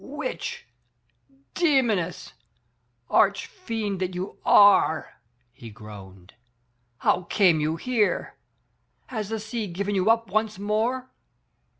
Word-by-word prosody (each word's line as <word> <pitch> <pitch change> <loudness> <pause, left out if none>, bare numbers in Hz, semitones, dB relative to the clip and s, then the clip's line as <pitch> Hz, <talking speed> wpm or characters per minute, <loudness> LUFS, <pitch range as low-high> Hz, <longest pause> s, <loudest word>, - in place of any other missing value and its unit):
."Witch, 295 - -5 0.9
demoness, 240 - 0 0.7
arch 200 -1 +2
fiend 225 - -4
that 185 -1 -3
you 185 +2 -6
are!" 200 -6 +4 0.3
he 120 -2 -11
groaned, 100 -4 -13 0.6
how 180 +6 +1
came 175 -4 +3
you 155 +1 0
here? 220 +3 -1 0.7
Has 215 -5 -4
the 225 0 -3
sea 220 0 -4
given 200 +3 -3
you 190 +2 +1
up 230 -3 +2
once 215 0 0
more?" 225 +6 -1
205 Hz, 105 wpm, -25 LUFS, 175-225 Hz, 0.9 s, are